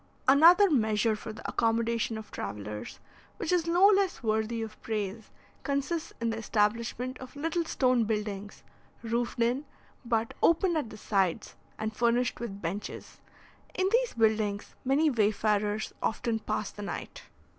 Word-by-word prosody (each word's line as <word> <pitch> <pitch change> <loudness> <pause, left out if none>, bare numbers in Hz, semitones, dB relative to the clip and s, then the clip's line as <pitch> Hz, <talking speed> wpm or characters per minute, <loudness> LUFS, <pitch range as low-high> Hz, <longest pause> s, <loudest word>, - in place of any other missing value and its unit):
Another 335 +9 +8
measure 220 - +2
for 220 +1 -7
the 215 - -8
accommodation 230 0 0
of 220 - -9
travellers, 105 +1 -6 0.4
which 370 -7 -2
is 345 -2 +2
no 350 +3 +5
less 395 -6 +3
worthy 220 +1 0
of 215 -1 -9
praise, 215 0 -4 0.3
consists 285 +4 -2
in 230 -1 0
the 225 - -3
establishment 230 +4 -1
of 260 +1 -10
little 325 +4 -1
stone 255 -6 +2
buildings, 210 -2 -4 0.4
roofed 235 +1 -2
in, 240 +4 +1 0.4
but 230 -2 0
open 340 +1 +3
at 295 -8 -1
the 215 - -10
sides, 195 -4 0 0.2
and 215 0 -3
furnished 240 +1 +1
with 205 -4 -6
benches. 190 +5 -5 0.6
In 375 +1 +1
these 485 +1 +2
buildings 215 -3 +1
many 290 +4 +3
wayfarers 210 -1 +1
often 225 0 -1
pass 215 -1 -3
the 205 - -9
night. 200 - -6
230 Hz, 145 wpm, -29 LUFS, 215-275 Hz, 0.6 s, Another